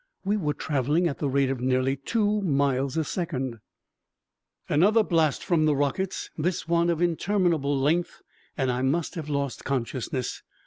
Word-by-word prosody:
We 205 +2 +2
were 150 -8 -1
traveling 150 +4 +1
at 145 - -4
the 145 - 0
rate 135 0 +2
of 130 -2 -3
nearly 130 +1 +1
two 210 - 0
miles 140 -5 +1
a 160 - +2
second! 135 - -3 1.1
Another 205 +9 +4
blast 160 -7 +1
from 165 -3 +2
the 150 - +3
rockets, 145 +7 -2
this 170 +2 -2
one 170 0 +2
of 170 0 +1
interminable 170 -5 +1
length, 160 +6 0 0.3
and 135 -3 +1
I 125 +1 -1
must 145 +5 0
have 155 -3 -6
lost 140 -4 -2
consciousness. 130 -1 -3
150 Hz, 160 wpm, -26 LUFS, 135-175 Hz, 1.1 s, Another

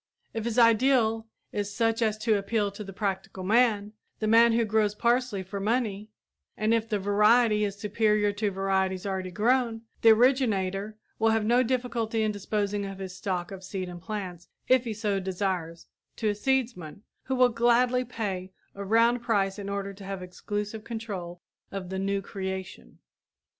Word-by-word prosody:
If 225 -1 -3
his 235 -1 -2
ideal 230 -1 +4 0.2
is 205 -1 -3
such 225 +2 0
as 215 -2 +1
to 225 -3 +3
appeal 205 0 0
to 200 +2 -8
the 195 - -8
practical 190 -1 -3
man 210 0 +2 0.2
the 215 - -3
man 230 +2 +6
who 230 0 +2
grows 210 -1 +1
parsley 235 -3 +1
for 200 +2 -6
money 215 -1 -1 0.5
and 215 +1 +2
if 225 -1 0
the 210 - +1
variety 210 +2 +4
is 200 -1 -1
superior 210 0 +1
to 205 +1 -1
varieties 190 -1 -1
already 190 -2 -2
grown, 230 +3 +1 0.2
the 225 - +7
originator 215 -4 +2 0.2
will 225 0 +3
have 220 -1 +1
no 240 +3 +4
difficulty 235 -3 -1
in 215 - +1
disposing 205 0 -2
of 195 -1 -6
his 190 -1 -7
stock 180 -2 -3
of 190 -1 -8
seed 190 -1 -4
and 175 -1 -9
plants, 185 -4 -6 0.2
if 255 -1 +4
he 225 - -2
so 205 -2 -1
desires, 185 -3 -3 0.3
to 220 - 0
a - - +1
seedsman, 215 - -2 0.2
who 265 - -1
will 250 -1 +5
gladly 240 +2 +3
pay 200 -6 -4 0.2
a 200 - -6
round 230 +4 +3
price 205 -4 0
in 200 0 -5
order 200 0 -3
to 195 +1 -12
have 195 -1 -5
exclusive 205 +4 -5
control 195 -7 -6 0.3
of 195 -2 -5
the 190 - -2
"new 195 0 -1
creation." 190 - -6
210 Hz, 175 wpm, -27 LUFS, 195-230 Hz, 0.5 s, the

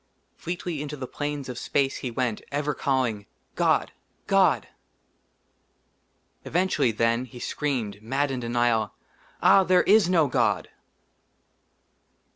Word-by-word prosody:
fleetly 175 -3 -4
into 150 0 -6
the 130 - -5
plains 145 0 -4
of 125 -1 -6
space 135 -1 0
he 130 - -4
went, 120 -2 -2
ever 145 +1 -1
calling, 125 -8 -1 0.3
"god! - - +1 0.3
god!" - - +3 1.8
eventually, 180 -6 +1
then, 115 +3 +1
he 125 0 -13
screamed, 120 -9 -3
mad 135 +5 -1
in 130 - -3
denial, 120 -1 0 0.5
"ah, 195 - +7
there 185 0 +4
is 205 -3 +5
no 170 -4 +4
god 125 - 0
135 Hz, 115 wpm, -26 LUFS, 120-150 Hz, 1.8 s, ah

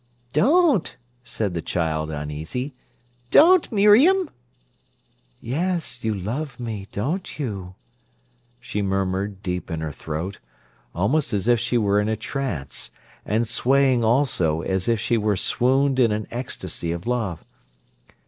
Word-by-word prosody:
"Don't!" 280 - +3 0.3
said 105 -5 -3
the 85 - -2
child, 80 -3 -1
uneasy—"don't, 120 - +1
Miriam!" 255 - +5 1.1
"Yes; 155 -1 -2
you 110 -1 0
love 125 +10 -4
me, 110 -5 -5
don't 155 - -3
you?" 100 -10 -5 0.8
she 105 -4 -4
murmured 95 0 -1
deep 90 -1 -3
in 80 -2 -3
her 80 -1 -3
throat, 80 +7 -5 0.6
almost 125 - +1
as 100 +1 -1
if 120 -1 +4
she 120 - 0
were 105 -2 +2
in 105 - -1
a 110 - +1
trance, 110 - -3 0.4
and 110 +3 +1
swaying 130 +2 +3
also 110 - +2
as 95 +3 -1
if 115 -2 +2
she 115 +2 +1
were 105 -2 +1
swooned 130 +6 +2
in 115 -3 +4
an 105 0 -2
ecstasy 120 -8 -4
of 85 +3 -5
love. 115 -9 -2
115 Hz, 130 wpm, -23 LUFS, 95-135 Hz, 1.1 s, Miriam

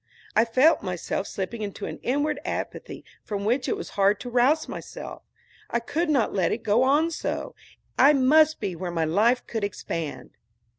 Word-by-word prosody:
I 220 - +5
felt 260 +8 +4
myself 185 +1 -3
slipping 205 +4 -5
into 205 -2 -5
an - - -6
inward 290 +4 0
apathy - - -5 0.2
from 200 -1 -4
which 245 +5 +1
it 435 - 0
was 405 - -7
hard 200 0 +2
to 245 - -6
rouse 260 +6 +3
myself. - - -8 0.5
I 235 - 0
could 310 +8 -2
not 270 -7 +2
let 185 -4 +1
it 225 - -3
go 215 +3 +3
on 295 +5 +3
so. - - -4 0.5
I 285 +2 +7
must 305 +3 +4
be 185 - -3
where 180 +2 -4
my 165 -2 0
life 220 +10 +2
could 225 -3 -4
expand. 165 -6 -4
235 Hz, 180 wpm, -25 LUFS, 200-290 Hz, 0.5 s, I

